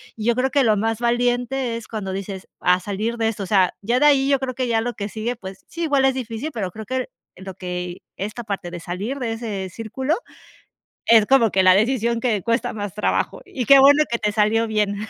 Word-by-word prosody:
Y 215 - -6
yo 235 - +4
creo 255 +2 +1
que 280 0 +2
lo 220 -3 +4
más 225 +2 -1
valiente 245 +1 0
es 230 - -10
cuando 210 -4 -5
dices: 195 0 -6 0.2
"Va, 180 0 +5
salir 210 +5 -3
de 225 -1 +1
esto", 220 -2 -3
o - - -4
sea, 190 -2 +2
ya 235 +5 +1
de 295 - +4
ahí 275 -2 +4
yo 275 -1 +3
creo 255 -1 -4
que 255 0 -1
ya 225 -1 +1
lo 240 +1 -3
que 200 - -4
sigue, 225 +3 -3
pues, 190 -4 -10
sí, 335 - -5
igual 285 -4 +2
es 265 -1 +2
difícil, 245 +2 -4
pero 200 -8 -4
creo 215 +4 -8
que 260 0 -2 0.3
lo 190 +1 -9
que 180 -1 -5
esta 210 +4 -5
parte 195 -5 -5
de 175 - -6
salir 190 +10 -4
de 235 -3 -2
ese 210 -5 -4
círculo, 235 - -2 0.9
es 225 -2 +6
como 250 -2 +4
que 190 -1 +2
la 185 0 +7
decisión 235 +3 +1
que 225 -4 0
cuesta 235 +1 0
más 205 -3 -5
trabajo. 210 - -1
Y 250 -3 -4
qué 275 +2 +8
bueno 285 +3 +7
que 235 - 0
te 210 -2 -1
salió 220 +2 +2
bien. 210 -2 0
225 Hz, 235 wpm, -22 LUFS, 200-250 Hz, 0.9 s, qué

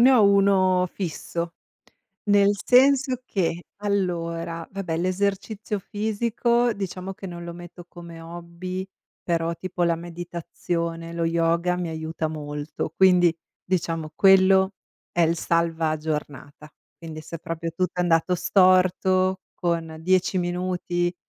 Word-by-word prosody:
ne 255 +3 +7
ho 235 -5 +6
1 195 -2 +4
fisso. 170 -2 -4 0.8
Nel 205 0 +5
senso 260 0 +4
che, 175 -5 -1
allora, 170 -5 -2
vabbè, 180 -5 -3
l'esercizio 200 +3 -1
fisico, 230 +4 0
diciamo 195 -1 -5
che 195 - -10
non 175 -1 -7
lo 170 - -6
metto 175 0 -11
come 170 -2 -11
hobby, 170 +3 -6 0.4
però 170 -1 0
tipo 180 0 -3
la 170 -1 +3
meditazione, 170 0 -4
lo 170 - -1
yoga 170 +2 +1
mi 180 -1 -2
aiuta 160 0 -3
molto. 150 0 -5
Quindi, 180 -3 +5 0.3
diciamo, 165 -3 -2
quello 190 0 +5 0.4
è 175 - +1
il 165 0 +2
salva 165 -1 +1
giornata. 150 -1 -5 0.3
Quindi, 160 -2 -8
se 165 - -7
proprio 165 +1 -4
tutto 180 +2 -1
è - - +4
andato 175 +1 +2
storto, 185 0 +3
con 165 -2 -2
10 185 +2 +2
minuti 175 0 -1
175 Hz, 125 wpm, -24 LUFS, 165-190 Hz, 0.8 s, ne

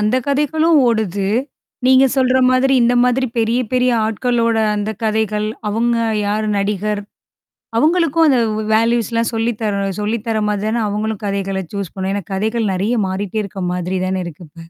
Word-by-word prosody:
அந்த 215 +4 +2
கதைகளும் 300 +3 +2
ஓடுது. 205 -4 0 0.6
நீங்க 260 +1 +6
சொல்ற 260 -1 +3
மாதிரி 255 +1 +3
இந்த 240 +1 +3
மாதிரி 250 +1 +1
பெரிய 230 +1 +1
பெரிய 250 0 +3 0.2
ஆட்களோட 230 +1 0 0.2
அந்த 210 +1 -2
கதைகள். 215 -1 0 0.2
அவுங்க 235 +3 +1 0.3
யார் 215 +1 -1
நடிகர்? 205 +1 -1 0.8
அவுங்களுக்கும் 330 +1 +3
அந்த 260 - +4 0.2
வே - - -2
வேல்யூஸ்லாம் 230 0 +1
சொல்லி 225 +1 0
தர 205 -2 -1 0.2
சொல்லி 215 +3 -1
தரமாரி 210 -2 0
தான 230 +1 0
அவுங்களும் 215 +1 -3
கதைகள 195 -1 -2
சூஸ் 200 -3 -4
பண்ணும், 190 0 -3
ஏன்னா 200 -2 -3
கதைகள் 220 +1 -1
நெறைய 200 +6 0
மாறிட்டே 200 +3 -3
இருக்க 195 -1 -7
மாதிரி 180 +1 -2
தானே 185 0 -1
இருக்கு 170 +1 -9
இப்ப. 150 - -38
220 Hz, 155 wpm, -18 LUFS, 200-245 Hz, 0.8 s, நீங்க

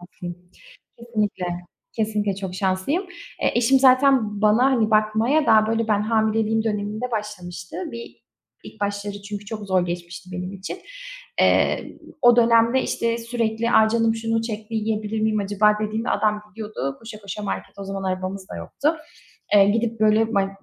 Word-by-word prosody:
şanslıyım. 175 0 -10 0.5
Kesinlikle, 215 -6 -2 0.5
kesinlikle 210 -2 0
çok 190 -2 -6
şanslıyım. 190 - 0 0.4
E, - - +2
eşim 245 +3 +4
zaten 255 -5 +4
bana 215 +4 +4
hani 245 -5 +2
bakmaya 220 +8 +2
daha 220 -1 +5
böyle 225 0 0
ben 210 -1 +2
hamileliğim 220 0 +1
döneminde 215 +3 -2
başlamıştı. 180 -5 -5 0.2
Bir 235 0 -9 0.4
ilk 220 - -12
başları 205 0 -3
çünkü 205 0 -6
çok 210 0 -6
zor 185 -2 +2
geçmişti 175 +1 -6
benim 180 +1 -5
için. 195 - -6 0.6
Iıı, - - +2 0.2
o 240 -1 +7
dönemde 235 +2 +4
işte 230 0 -1
sürekli: 230 -1 -1
"A, 220 -2 +5
canım 225 0 +2
şunu 225 0 -1
çekti; 220 0 -6
yiyebilir 215 0 -1
miyim 215 -1 +1
acaba?" 205 +1 +2
dediğimde 215 +2 -2
adam 210 0 +1
gidiyordu 210 -11 -5
koşa 225 -1 -10
koşa 205 +1 -6
markete. 200 0 -5
O - - -5
zaman 195 0 -5
arabamız 185 +1 -3
da - - -7
yoktu. 305 +3 -1 0.6
Eee, 200 -1 +7
gidip 225 +1 0
böyle 220 +1 +3
bay 195 -1 +2
215 Hz, 155 wpm, -23 LUFS, 200-225 Hz, 0.6 s, o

